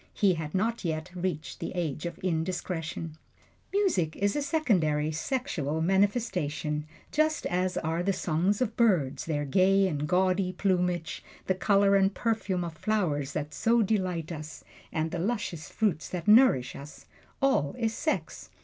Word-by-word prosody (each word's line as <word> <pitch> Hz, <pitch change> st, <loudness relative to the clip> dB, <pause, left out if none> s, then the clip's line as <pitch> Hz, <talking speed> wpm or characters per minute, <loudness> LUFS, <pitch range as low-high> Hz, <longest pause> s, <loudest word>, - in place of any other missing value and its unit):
He 200 Hz, -3 st, +4 dB
had 160 Hz, -1 st, -5 dB
not 225 Hz, +4 st, 0 dB
yet 160 Hz, +1 st, -3 dB
reached 175 Hz, -4 st, -3 dB
the -, -, -4 dB
age 165 Hz, -2 st, -2 dB
of 170 Hz, -, -7 dB
indiscretion. 165 Hz, -2 st, -3 dB, 0.5 s
Music 340 Hz, -, +1 dB
is 200 Hz, 0 st, 0 dB
a 295 Hz, -, 0 dB
secondary 175 Hz, -, +1 dB
sexual 160 Hz, -, -2 dB
manifestation, 180 Hz, -6 st, 0 dB, 0.2 s
just 310 Hz, 0 st, +1 dB
as 180 Hz, +1 st, 0 dB
are 165 Hz, +1 st, -1 dB
the 195 Hz, +3 st, +1 dB
songs 185 Hz, +4 st, 0 dB
of 225 Hz, -2 st, -4 dB
birds, 165 Hz, -, +2 dB
their 145 Hz, -2 st, -1 dB
gay 190 Hz, +6 st, +4 dB
and 150 Hz, -4 st, -2 dB
gaudy 185 Hz, +1 st, +2 dB
plumage, 180 Hz, -3 st, 0 dB, 0.2 s
the 190 Hz, -, +2 dB
color 200 Hz, +1 st, +3 dB
and 195 Hz, 0 st, +3 dB
perfume 205 Hz, -6 st, -1 dB
of 170 Hz, -1 st, -5 dB
flowers 155 Hz, -7 st, -1 dB
that 150 Hz, 0 st, -3 dB
so 230 Hz, 0 st, +3 dB
delight 185 Hz, -6 st, -1 dB
us, 155 Hz, -1 st, -7 dB, 0.3 s
and 160 Hz, 0 st, -1 dB
the 175 Hz, -, -3 dB
luscious 185 Hz, -6 st, -2 dB
fruits 200 Hz, -8 st, -1 dB
that 175 Hz, -2 st, -5 dB
nourish 215 Hz, -, +5 dB
us 140 Hz, +2 st, -11 dB, 0.3 s
all 265 Hz, -, +2 dB
is 225 Hz, -2 st, 0 dB
sex. 315 Hz, -, -2 dB
180 Hz, 150 wpm, -28 LUFS, 155-205 Hz, 0.5 s, nourish